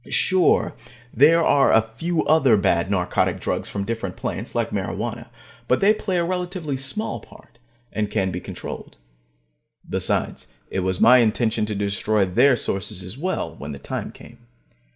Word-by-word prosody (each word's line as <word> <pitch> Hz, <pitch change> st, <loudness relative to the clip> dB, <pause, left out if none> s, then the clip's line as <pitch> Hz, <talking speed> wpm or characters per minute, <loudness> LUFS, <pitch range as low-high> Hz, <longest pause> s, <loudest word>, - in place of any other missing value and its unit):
Sure, 185 Hz, -3 st, +2 dB, 0.4 s
there 165 Hz, +5 st, +5 dB
are 140 Hz, -3 st, +4 dB
a 110 Hz, -, +5 dB
few 160 Hz, +10 st, -2 dB
other 140 Hz, -8 st, +4 dB
bad 95 Hz, -2 st, +1 dB
narcotic 90 Hz, -3 st, 0 dB
drugs -, -, -2 dB
from 100 Hz, -, -3 dB
different 110 Hz, -4 st, -4 dB
plants, -, -, -5 dB
like -, -, 0 dB
marijuana, -, -, -4 dB, 0.4 s
but 125 Hz, -, +2 dB
they 205 Hz, +2 st, +5 dB
play 190 Hz, -4 st, -2 dB
a 170 Hz, -, +2 dB
relatively 180 Hz, -4 st, -3 dB
small 140 Hz, +12 st, -4 dB
part, -, -, -18 dB, 0.3 s
and 105 Hz, -1 st, -1 dB
can 95 Hz, -2 st, 0 dB
be 90 Hz, -, -4 dB
controlled. -, -, -8 dB, 0.9 s
Besides, -, -, -2 dB, 0.2 s
it -, -, -1 dB
was 95 Hz, 0 st, -1 dB
my 125 Hz, +2 st, +7 dB
intention 110 Hz, -1 st, +1 dB
to 105 Hz, -, -3 dB
destroy 100 Hz, +1 st, 0 dB
their 125 Hz, +9 st, +4 dB
sources 95 Hz, -3 st, -2 dB
as 90 Hz, +4 st, -7 dB
well, 185 Hz, +7 st, -3 dB
when 75 Hz, 0 st, -7 dB
the -, -, -7 dB
time 70 Hz, -, -5 dB
came. -, -, -15 dB
115 Hz, 160 wpm, -23 LUFS, 100-160 Hz, 0.9 s, my